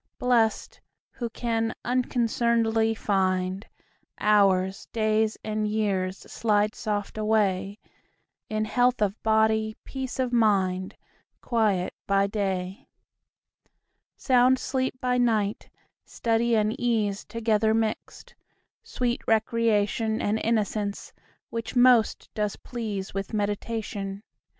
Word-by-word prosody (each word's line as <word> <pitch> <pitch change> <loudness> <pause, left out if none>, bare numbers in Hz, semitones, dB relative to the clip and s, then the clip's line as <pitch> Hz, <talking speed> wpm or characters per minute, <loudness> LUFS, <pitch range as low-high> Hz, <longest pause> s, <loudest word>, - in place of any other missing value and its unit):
Blest, 235 -3 +1 0.3
who 235 -2 -5
can 225 -1 -2
unconcern'dly 230 -2 +1
find 185 -1 0 0.5
Hours, 195 -2 +2
days, 215 -1 +1
and 215 0 -1
years 200 -3 -1
slide 210 -1 0
soft 210 -1 -3
away 205 -2 +1 0.7
In 215 0 -1
health 245 +3 +2
of 205 +1 -2
body, 220 0 +2
peace 265 -2 -5
of 255 -2 -1
mind, 190 -5 +1 0.4
Quiet 215 -6 0
by 195 0 +3
day, 195 +1 -3 1.3
Sound 255 0 +4
sleep 260 0 -2
by 250 -1 0
night; 220 -4 0 0.3
study 230 0 0
and 215 0 +2
ease 215 -5 0
Together 220 -1 +1
mixt, 220 -1 -3 0.5
sweet 245 -1 -2
recreation, 220 -1 +1
And 215 +2 0
innocence, 210 -2 -1 0.4
which 230 +2 -5
most 245 -2 +4
does 210 -1 -1
please 215 -5 -5
With 195 +3 -4
meditation. 205 -1 -3
220 Hz, 100 wpm, -26 LUFS, 205-230 Hz, 1.3 s, Sound